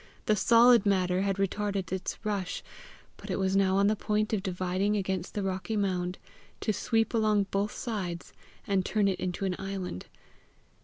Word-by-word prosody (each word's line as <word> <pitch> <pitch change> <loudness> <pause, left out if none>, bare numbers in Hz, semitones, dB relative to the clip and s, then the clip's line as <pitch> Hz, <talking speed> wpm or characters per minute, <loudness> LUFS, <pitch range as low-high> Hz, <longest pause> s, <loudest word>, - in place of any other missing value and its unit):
The 215 - +3
solid 235 +2 +6
matter 185 -2 +2
had 195 0 0
retarded 195 -1 -1
its 190 0 -3
rush, 200 -4 -2 0.5
but - - -11
it - - -1
was 190 0 +1
now 190 -1 +3
on 200 - +4
the 210 +1 +3
point 215 +1 -1
of 210 - +1
dividing 185 +2 -1
against 190 -2 -3
the 205 - -1
rocky 190 +3 -2
mound, 185 -2 -1 0.4
to 215 - 0
sweep 225 +3 0
along 215 -3 +3
both 200 +2 0
sides, 185 -7 -4 0.3
and 195 -2 +1
turn 205 +1 +1
it 190 -2 0
into 185 +2 -2
an 185 -1 0
island. 195 - -5
195 Hz, 170 wpm, -29 LUFS, 185-210 Hz, 0.5 s, solid